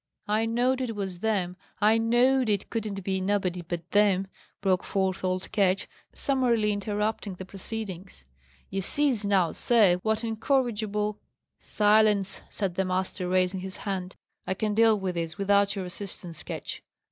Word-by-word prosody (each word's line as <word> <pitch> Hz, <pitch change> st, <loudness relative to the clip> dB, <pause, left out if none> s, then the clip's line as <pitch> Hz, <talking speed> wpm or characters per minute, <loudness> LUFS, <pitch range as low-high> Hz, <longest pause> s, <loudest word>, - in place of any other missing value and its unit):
"I 215 Hz, +2 st, +1 dB
knowed 250 Hz, +3 st, +1 dB
it 235 Hz, -4 st, -3 dB
was 190 Hz, -3 st, -4 dB
them! 190 Hz, -4 st, 0 dB, 0.2 s
I 215 Hz, +2 st, +4 dB
knowed 245 Hz, +2 st, +3 dB
it 205 Hz, -2 st, -1 dB
couldn't 210 Hz, -4 st, -3 dB
be 190 Hz, 0 st, -1 dB
nobody 185 Hz, -2 st, 0 dB
but 175 Hz, 0 st, -6 dB
them!" 200 Hz, -2 st, +3 dB, 0.3 s
broke 185 Hz, -2 st, +1 dB
forth 190 Hz, -1 st, -1 dB
old 185 Hz, 0 st, -2 dB
Ketch, 195 Hz, -2 st, +2 dB, 0.2 s
summarily 240 Hz, -6 st, +1 dB
interrupting 205 Hz, 0 st, -2 dB
the 190 Hz, -, -8 dB
proceedings. 195 Hz, -, -6 dB, 0.5 s
"You 195 Hz, -, -1 dB
sees 245 Hz, 0 st, +2 dB
now, 185 Hz, -5 st, +3 dB
sir, 210 Hz, -7 st, +4 dB
what 220 Hz, +4 st, 0 dB
incorrigible 220 Hz, -3 st, 0 dB, 0.3 s
" -, -, -57 dB, 0.2 s
"Silence!" 210 Hz, -2 st, +4 dB
said 195 Hz, -4 st, -2 dB
the 190 Hz, -, 0 dB
master, 185 Hz, 0 st, -1 dB
raising 185 Hz, +1 st, +1 dB
his 190 Hz, 0 st, -6 dB
hand. 190 Hz, -2 st, -4 dB, 0.3 s
"I 190 Hz, -, 0 dB
can 210 Hz, +1 st, -1 dB
deal 220 Hz, -1 st, +4 dB
with 190 Hz, -2 st, -2 dB
this 165 Hz, -2 st, -4 dB
without 200 Hz, 0 st, +3 dB
your 190 Hz, -2 st, -3 dB
assistance, 180 Hz, -3 st, -7 dB
Ketch. -, -, -6 dB
200 Hz, 155 wpm, -27 LUFS, 185-220 Hz, 0.5 s, I